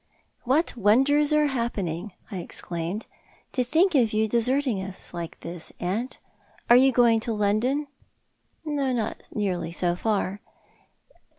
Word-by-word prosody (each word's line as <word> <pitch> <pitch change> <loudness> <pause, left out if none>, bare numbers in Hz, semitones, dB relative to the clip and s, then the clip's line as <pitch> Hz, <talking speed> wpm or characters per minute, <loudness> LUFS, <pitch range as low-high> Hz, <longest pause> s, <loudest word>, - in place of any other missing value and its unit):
" - - -43
What 310 +3 +2
wonders 270 +8 +4
are 300 0 +4
happening," 215 - -2 0.2
I 195 - -4
exclaimed. 175 +3 -4 0.4
"■ - - -44
To 255 - 0
think 330 +9 +3
of 235 -7 +3
you 220 +1 +2
deserting 240 0 +1
us 190 -1 -9
like 170 -1 -6
this, 170 0 -7
aunt! 210 +9 -2 0.5
Are - - +10
you 265 +2 +6
going 235 -2 +4
to 225 +1 -3
London? 215 +8 +1 0.3
" - - -47
" - - -38
Not 270 -7 -1
nearly 180 -5 -2
so 175 0 0
far." 200 0 -1
225 Hz, 150 wpm, -26 LUFS, 190-265 Hz, 0.5 s, Are